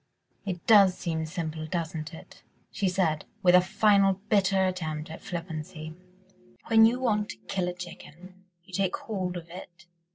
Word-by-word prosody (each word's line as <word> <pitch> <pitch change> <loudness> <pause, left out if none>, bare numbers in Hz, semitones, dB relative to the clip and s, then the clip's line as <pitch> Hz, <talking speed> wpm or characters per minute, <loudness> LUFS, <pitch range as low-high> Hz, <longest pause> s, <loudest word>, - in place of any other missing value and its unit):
"It 180 -3 -4
does 200 -4 +6
seem 160 -2 -3
simple, 160 -1 -4
doesn't 160 -2 -4
it?" 160 - -13 0.3
she 195 -2 0
said, 170 -4 0 0.2
with 180 -1 +6
a 180 - +8
final 195 +1 +3 0.2
bitter 195 -2 +3
attempt 160 -4 -3
at 160 - -9
flippancy, 160 -2 -6 0.8
"when 225 0 +7
you 245 +2 0
want 210 -5 0
to - - -7
kill 185 -2 -1
a 180 - -2
chicken... 180 +1 -11 0.2
you 185 - -19
take 190 0 0
hold 185 -5 -4
of 170 -1 -9
it 175 0 -11
180 Hz, 160 wpm, -28 LUFS, 160-195 Hz, 0.8 s, a